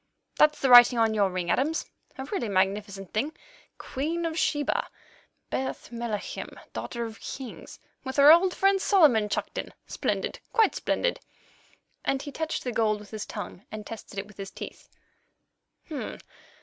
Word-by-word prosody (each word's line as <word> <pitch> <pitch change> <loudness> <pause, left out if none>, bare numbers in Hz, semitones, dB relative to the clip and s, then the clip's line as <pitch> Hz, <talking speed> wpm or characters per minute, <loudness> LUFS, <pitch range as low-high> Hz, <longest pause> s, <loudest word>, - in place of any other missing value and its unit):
"That's 300 0 +5
the 270 - +2
writing 245 0 +9
on 225 -1 +3
your 205 -2 +3
ring, 180 -2 -2
Adams—a 280 -1 -2
really 245 - -1
magnificent 195 0 -1
thing. 280 +9 -1 0.4
'Queen 325 +6 -3
of 325 -1 -2
Sheba—Bath 290 -4 -3
Melachim, 230 -3 -5 0.2
Daughter 235 -1 -4
of 225 -1 -9
Kings,' 260 -3 -8 0.3
with 260 0 -5
our 285 +2 +9
old 360 +3 +5
friend 390 0 +3
Solomon 280 - +4
chucked - - -2
in. - - -5
Splendid, - - -2
quite 445 -3 +4
splendid!"—and 275 - -4
he 285 - -6
touched 320 +2 -3
the 250 - -2
gold 215 -2 +1
with 210 - -13
his 215 -1 -5
tongue, 200 -2 -7
and 215 -1 -6
tested 220 -2 -9
it 195 - -3
with 210 -1 -17
his 195 -1 -6
teeth. - - -9
240 Hz, 145 wpm, -27 LUFS, 210-300 Hz, 0.4 s, writing